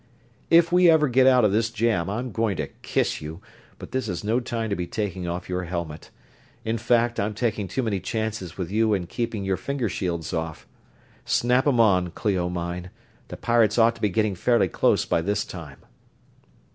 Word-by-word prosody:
"If 170 0 +5
we 180 0 +6
ever 160 -2 +5
get 130 +1 +4
out 125 -3 +5
of 105 - +3
this 110 +2 +1
jam 115 -6 0
I'm 120 +5 -3
going 110 -5 -1
to - - -3
kiss - - -1
you, 80 +3 -7 0.4
but - - -10
this 130 -4 -2
is 90 +1 -4
no 110 +4 +1
time 115 -3 -3
to - - +1
be 90 -2 -4
taking 95 -4 -3
off 90 +1 -4
your 90 0 -2
helmet. 85 -3 -5 0.6
In 110 +1 -1
fact, 120 +1 +2
I'm 105 +1 -1
taking 110 -3 -1
too 130 - -2
many 105 -4 -1
chances 110 -5 -4
with 90 -2 -4
you 110 0 +2
in 90 -3 -3
keeping 115 +1 -3
your 95 -1 0
finger 125 +3 -2
shields 85 -3 -3
off. 80 -1 -4 0.6
Snap 125 +3 +2
'em 130 -4 +3
on, 95 -6 +4
Clio 90 -1 -1
mine; 90 +1 -4 0.4
the - - -8
pirates 115 -2 +2
ought 115 0 +5
to 115 - -16
be 105 - +2
getting 105 +2 +1
fairly 120 +6 +2
close - - +2
by 85 - +1
this 100 +4 -1
time." 75 -7 -9
105 Hz, 195 wpm, -24 LUFS, 90-120 Hz, 0.6 s, we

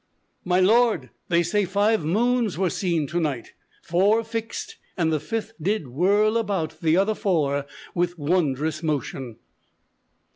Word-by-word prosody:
_ - - -48 0.4
"My 180 0 +2
lord, 205 - +3 0.2
they 170 -1 +3
say 205 +5 +1
five 205 +2 +1
moons 230 +5 +1
were 185 -2 +1
seen 170 -5 0
to 170 +5 -2
night; 145 -8 -3 0.3
Four 200 +6 +2
fixed; 225 0 -5 0.2
and 160 -3 +1
the 155 - +1
fifth 220 +8 -4
did 185 -5 -1
whirl 205 - +2
about 195 -8 -2
The 165 0 +3
other 200 +3 +2
four 145 -9 0 0.3
with 175 0 -1
wondrous 155 -1 0
motion." 135 -6 -3
180 Hz, 145 wpm, -24 LUFS, 155-210 Hz, 0.4 s, lord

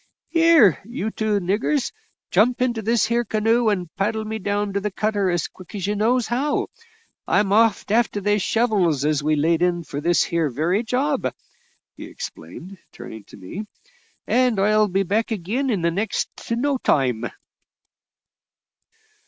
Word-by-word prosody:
"Here, 330 - +5
you 220 0 -4
two 215 -2 0
niggers, 210 - 0 0.4
jump 245 +3 +3
into 240 -3 0
this 230 +2 +2
here 235 +1 +1
canoe 225 +1 +1
and 180 -5 -2
paddle 215 +2 -1
me 220 +1 -4
down 205 0 -2
to 200 - 0
the 210 +1 -2
cutter 205 -1 0
as 175 -2 0
quick 185 +2 -14
as 195 -3 -3
you 205 +1 -1
knows 235 +3 +2
how. 265 +6 -1 0.6
I'm 200 -1 +2
off 225 -1 +3
a'ter 220 0 +1
they 205 +1 +1
shovels 195 - +1
as 150 -1 +1
we 155 +1 +1
laid 160 +3 +1
in 175 -1 +1
for 145 -2 -6
this 170 +2 +3
here 165 -3 0
very 160 - 0
job," 260 +5 -1 0.6
he - - -9
explained, 195 - -9
turning 110 -2 -10
to - - -14
me, 195 - -7 0.6
"and 250 -4 +2
I'll 215 +1 +3
be 195 +1 0
back 215 +5 -1
ag'in 220 +7 -2
in 205 -7 0
next 210 +5 -2
to 230 - 0
no 275 +3 0
time." 125 - +1
210 Hz, 160 wpm, -22 LUFS, 180-230 Hz, 0.6 s, Here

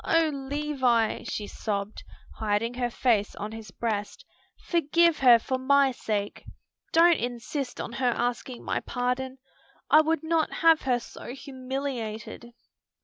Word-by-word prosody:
"O 330 -1 +3
Levis!" 270 -5 0
she 210 - -3
sobbed, 205 0 -4 0.3
hiding 220 +2 -1
her 245 -1 -1
face 230 -4 +1
on 210 +1 -5
his 220 -2 -9
breast, 220 - -4 0.4
"forgive 335 0 +3
her 245 -3 +8
for 260 +3 -3
my 280 +1 +4
sake. 210 -4 -3 0.5
Don't 335 0 +5
insist 245 +3 -4
on - - -4
her 250 +1 0
asking 240 +1 -2
my - - -1
pardon. 250 +1 -2 0.5
I 310 - +8
would 320 +1 0
not 320 -1 +1
have 325 -1 +4
her 250 -2 +1
so 245 +1 -9
humiliated." 255 -5 -5
255 Hz, 135 wpm, -27 LUFS, 225-285 Hz, 0.5 s, her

